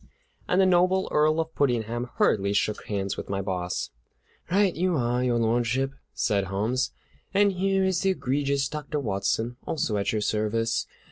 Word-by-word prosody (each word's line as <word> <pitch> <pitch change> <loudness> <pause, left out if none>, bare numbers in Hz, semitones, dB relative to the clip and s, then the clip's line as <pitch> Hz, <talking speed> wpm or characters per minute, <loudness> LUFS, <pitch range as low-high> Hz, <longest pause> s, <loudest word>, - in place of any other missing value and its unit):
And 180 - +2
the 190 - +6
noble 185 +1 +3
Earl 155 +1 +3
of 160 0 -2
Puddingham 120 -2 0
hurriedly 100 -1 +2
shook 105 +1 0
hands 100 -2 -2
with - - -6
my 100 0 -1
boss. 90 -7 -3 0.6
"Right 195 0 +3
you 180 +1 +1
are, 120 0 0
Your 120 -2 +2
Lordship," 120 +3 +1 0.2
said 100 -2 0
Holmes, 110 +8 0 0.5
"and 200 0 +5
here 195 +1 +1
is 190 -2 +1
the 195 - +2
egregious 140 -4 0
Dr. 150 +1 -4
Watson, 115 +1 -1
also 110 -9 -1
at 100 - 0
your 110 - -1
service. 110 +2 0
125 Hz, 160 wpm, -26 LUFS, 105-165 Hz, 0.6 s, the